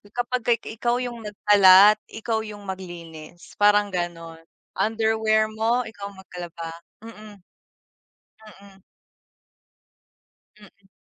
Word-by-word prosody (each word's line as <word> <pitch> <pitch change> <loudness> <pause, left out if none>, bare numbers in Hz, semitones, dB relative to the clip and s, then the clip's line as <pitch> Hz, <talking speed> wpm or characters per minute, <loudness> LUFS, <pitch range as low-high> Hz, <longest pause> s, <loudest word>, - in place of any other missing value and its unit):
kapagka 245 -1 0
i 230 - -10
ikaw 240 0 +1
yung 240 -1 -6
nagkalat, 205 0 +6
ikaw 225 0 -3
yung 210 -1 -10
maglinis, 175 -3 -10
parang 205 0 +4
ganun 165 -2 -5 0.4
underwear 220 0 +1
mo, 225 +3 0
ikaw 200 -2 -9
maglaba 175 -3 -9 0.4
mm. 215 -2 -12 1.2
Mm. 195 -1 -18 1.8
Mm. 200 -1 -20
205 Hz, 95 wpm, -23 LUFS, 185-220 Hz, 1.8 s, nagkalat